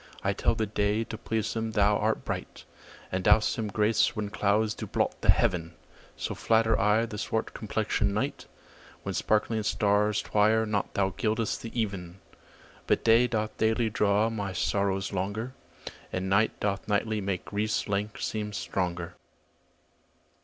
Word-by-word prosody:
I - - +1
tell - - +1
the 110 - 0
day, 105 +1 0
to 115 - -7
please 110 -1 -2
him 110 0 -2
thou 105 0 +4
art 110 +2 0
bright, - - -5 0.5
And 95 0 -1
dost 105 +2 +4
him 110 -2 -2
grace 105 +2 +2
when 105 -1 -3
clouds 105 +1 +1
do - - -6
blot - - -1
the - - -2
heaven: 85 -2 +2 0.4
So - - -3
flatter 115 0 +2
I 105 +3 +3
the 105 -2 -7
swart 110 +1 -2
complexion'd - - -1
night, - - -2 0.6
When - - -3
sparkling 110 +1 +1
stars 105 0 +2
twire 110 +2 +3
not 105 -2 -2
thou 95 -1 +2
gild'st 110 +3 -1
the 115 +1 -5
even. 95 -4 -3 0.7
But - - +2
day 115 +2 +5
doth 110 -2 -2
daily 110 0 +1
draw 105 +2 +2
my 100 -4 -3
sorrows 95 +1 0
longer, 100 +6 -3 0.6
And 95 +1 -2
night 100 +3 +2
doth 100 -1 -2
nightly 105 +1 0
make 95 -2 -3
grief's 105 +1 -1
length 105 +1 -2
seem 105 -1 -3
stronger. 90 -3 -3
105 Hz, 155 wpm, -28 LUFS, 100-110 Hz, 0.7 s, day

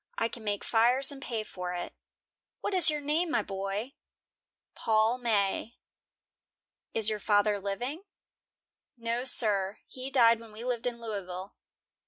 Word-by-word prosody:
I 230 - +1
can 230 - -9
make 205 -1 -1
fires 245 +5 +3
and 275 -1 -9
pay 230 -4 -3
for 180 -3 -5
it." 175 - -5 0.7
"What 410 - -2
is 360 -3 +6
your 300 -1 0
name, 310 +4 +1
my 230 - +1
boy?" 195 +6 -4 0.8
"Paul 220 +2 +2
May." 220 -1 0 1.2
"Is 220 -2 +3
your 215 -1 +1
father 205 0 +3
living?" 245 - -4 0.9
"No, 235 +2 -2
sir; 205 -6 +3
he 260 +1 -7
died 235 -4 +5
when 225 -2 -13
we 220 +2 -8
lived 245 -1 -1
in 240 -1 -3
Louisville." 195 -4 -5
225 Hz, 145 wpm, -30 LUFS, 205-250 Hz, 1.2 s, is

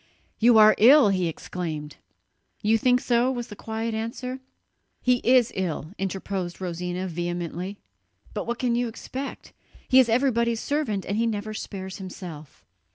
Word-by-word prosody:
"You 235 0 +6
are 215 0 +8
ill!" 260 +1 +8
he 185 -3 +1
exclaimed. 155 -3 -5 0.7
"You 220 +2 +3
think 250 +2 +4
so?" 245 0 +2
was 240 -2 -4
the 210 - -8
quiet 225 +2 -4
answer. 240 +4 -4 0.6
"He 250 0 +3
is 245 -1 +4
ill," 170 -4 -3
interposed 190 -2 -3
Rosina 180 0 -3
vehemently, 175 +2 -4 0.6
"but 210 - -4
what 235 0 -2
can 245 -1 0
you 240 +1 +1
expect? 260 +4 -7 0.3
He 260 - +6
is 250 -3 +5
everybody's 235 -2 +2
servant, 250 -11 -1
he 220 +4 0
never 215 -1 -3
spares 190 -3 -6
himself. 175 -6 -9
215 Hz, 145 wpm, -25 LUFS, 185-240 Hz, 0.7 s, are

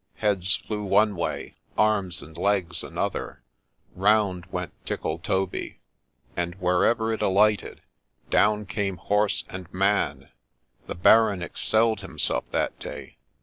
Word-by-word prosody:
Heads 100 -3 +1
flew 105 -1 -5
one 100 +1 +3
way 85 - -4
— - - -32
arms 105 -5 +1
and 80 +2 -13
legs 90 -5 0
another; - - -4 0.5
round 95 -2 +2
went 90 -3 -4
Tickletoby; 90 +4 -2 0.6
and, 85 0 -2
wherever 100 +5 +2
it 110 - -4
alighted, 105 +2 +2 0.5
down 105 +1 +3
came 100 -1 -2
horse 105 +1 +1
and 90 -1 -8
man: 100 +2 0 0.6
the - - -4
Baron 100 0 +5
excelled 110 +4 +1
himself 95 - -2
that - - -1
day. 70 -2 -8
100 Hz, 120 wpm, -25 LUFS, 90-105 Hz, 0.6 s, Baron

